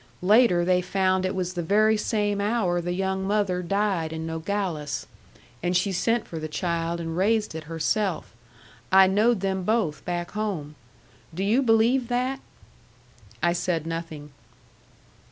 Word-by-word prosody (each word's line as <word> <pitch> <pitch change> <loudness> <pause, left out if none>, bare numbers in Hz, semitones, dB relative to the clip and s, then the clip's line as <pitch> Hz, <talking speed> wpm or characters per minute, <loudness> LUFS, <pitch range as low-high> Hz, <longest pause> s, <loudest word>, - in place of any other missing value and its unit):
Later 195 -3 +4
they 180 0 +3
found 185 0 +1
it 185 - -3
was 185 -1 -2
the 175 - -2
very 215 +5 +3
same 205 -1 0
hour 200 -5 0
the 175 +1 -3
young 190 +1 -1
mother 200 -3 0
died 190 -3 0
in 160 0 -5
Nogales. 160 -2 -3 0.6
And 175 +1 +1
she 195 +2 0
sent 230 +5 0
for 165 - -6
the 155 - -4
child 170 +1 -2
and 165 -1 -4
raised 210 +3 +1
it 160 0 -7
herself. 165 - -1 0.6
I 190 0 +8
knowed 210 +3 +2
them 190 -1 -1
both 215 -7 0
back 175 -1 -3
home. 195 -9 -3 0.6
Do 190 - -2
you 220 +7 +3
believe 235 +1 +3
that?" 255 +2 -1 1.0
I 170 0 +3
said 170 -2 -1
nothing. 165 -3 -6
185 Hz, 150 wpm, -25 LUFS, 170-210 Hz, 1.0 s, I